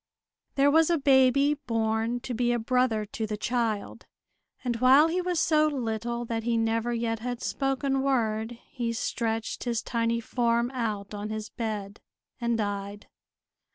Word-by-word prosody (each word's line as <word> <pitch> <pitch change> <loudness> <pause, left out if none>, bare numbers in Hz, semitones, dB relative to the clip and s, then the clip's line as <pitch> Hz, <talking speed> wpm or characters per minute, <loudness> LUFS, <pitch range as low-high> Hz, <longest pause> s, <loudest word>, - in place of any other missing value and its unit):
There 280 +1 +4
was 320 +2 +4
a 340 - +3
baby 275 0 +4
born 230 -3 -1
to 250 - -5
be 240 +1 +1
a 240 - +1
brother 235 -2 +1
to 220 +1 -4
the 210 0 -3
child; 230 -2 -2 0.6
and 240 -2 -1
while 265 +6 +6
he 360 +2 0
was 360 -2 -1
so 310 -1 +3
little 235 -3 -2
that 230 -1 -2
he 230 0 0
never 225 +1 0
yet 230 -1 -1
had 245 +1 -4
spoken 270 0 -1
word 230 -4 0
he 235 -3 -2
stretched 225 0 -2
his 235 -2 -1
tiny 230 -1 0
form 235 +1 0
out 215 -5 -3
on 205 +1 -5
his 215 0 -5
bed, 210 -3 -4 0.4
and 235 -1 0
died. 205 -1 -4
235 Hz, 155 wpm, -27 LUFS, 220-255 Hz, 0.6 s, while